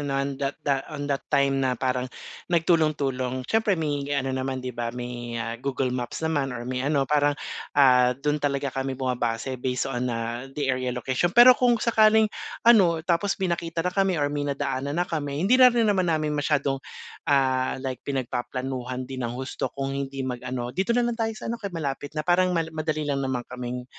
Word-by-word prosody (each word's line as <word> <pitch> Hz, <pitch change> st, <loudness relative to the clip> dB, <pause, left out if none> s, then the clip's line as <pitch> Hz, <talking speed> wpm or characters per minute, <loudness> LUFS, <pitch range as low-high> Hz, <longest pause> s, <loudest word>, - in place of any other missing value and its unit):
no'n 140 Hz, -1 st, -2 dB
da 140 Hz, 0 st, -1 dB
da 140 Hz, -2 st, +2 dB, 0.2 s
on 145 Hz, -, -4 dB
that 135 Hz, -, -4 dB
time 135 Hz, 0 st, +2 dB
na 130 Hz, -2 st, +1 dB
parang 130 Hz, 0 st, -1 dB, 0.4 s
nagtulong-tulong. 145 Hz, -7 st, +1 dB
Syempre 220 Hz, -, +1 dB
may 145 Hz, -3 st, -2 dB
ano 135 Hz, -1 st, -1 dB
naman 130 Hz, 0 st, -3 dB
'di 125 Hz, -, -3 dB
ba, 120 Hz, 0 st, -3 dB
may, 120 Hz, -1 st, -5 dB
ah, 115 Hz, +1 st, -4 dB
Google 135 Hz, -2 st, -1 dB
Maps 125 Hz, +5 st, -4 dB
naman 140 Hz, -6 st, 0 dB
or 120 Hz, -, -6 dB
may 125 Hz, 0 st, -3 dB
ano, 140 Hz, 0 st, +1 dB
parang, 145 Hz, 0 st, +2 dB, 0.4 s
ah, 125 Hz, -2 st, +5 dB
dun 150 Hz, +1 st, -1 dB
talaga 140 Hz, -2 st, -1 dB
kami 135 Hz, -1 st, -3 dB
bumabase, 125 Hz, -1 st, -2 dB
based 125 Hz, 0 st, -1 dB
on, 125 Hz, -1 st, -2 dB
ah, 120 Hz, +2 st, -3 dB
the 135 Hz, -2 st, +1 dB
area 130 Hz, 0 st, -2 dB
location. 125 Hz, +6 st, 0 dB
Pero 250 Hz, +1 st, +10 dB
kung 245 Hz, -1 st, +3 dB
sakaling 220 Hz, -1 st, +4 dB, 0.4 s
ano, 180 Hz, -9 st, +5 dB
tapos 175 Hz, +3 st, +1 dB
may 185 Hz, -3 st, 0 dB
nakita 165 Hz, 0 st, -3 dB
na 180 Hz, -, 0 dB
kami 195 Hz, -2 st, +2 dB
or 145 Hz, -1 st, 0 dB
may 145 Hz, -1 st, -2 dB
nadaanan 140 Hz, +1 st, -2 dB
na 175 Hz, -, +2 dB
kami, 145 Hz, -4 st, -3 dB
hindi 255 Hz, +5 st, +4 dB
na 250 Hz, -, +10 dB
rin 235 Hz, -2 st, +2 dB
naman 190 Hz, -4 st, +2 dB
namin 155 Hz, -2 st, +1 dB
masyadong, 140 Hz, -2 st, 0 dB, 0.5 s
ah, 130 Hz, -2 st, +2 dB
like 130 Hz, -2 st, -3 dB
pinagpaplanuhan 130 Hz, 0 st, -3 dB
din 130 Hz, 0 st, -7 dB
ng 120 Hz, 0 st, -3 dB
husto, 130 Hz, +1 st, -3 dB
kung 135 Hz, 0 st, -2 dB
hindi 135 Hz, -1 st, -3 dB
mag-ano, 125 Hz, -1 st, -4 dB
"dito 195 Hz, +6 st, 0 dB
na 245 Hz, -, +3 dB
lang 240 Hz, -, 0 dB
tayo 225 Hz, 0 st, 0 dB
sa -, -, -9 dB
ano, 235 Hz, -, -5 dB
kaya 200 Hz, -3 st, -5 dB
malapit 145 Hz, 0 st, -4 dB
na," 155 Hz, -, -1 dB
parang 180 Hz, 0 st, +3 dB
mal 165 Hz, -1 st, -1 dB
madali 155 Hz, -1 st, -2 dB
lang 140 Hz, -1 st, -1 dB
naman 130 Hz, -3 st, -2 dB
kaming, 125 Hz, 0 st, -6 dB
140 Hz, 200 wpm, -25 LUFS, 130-160 Hz, 0.5 s, Pero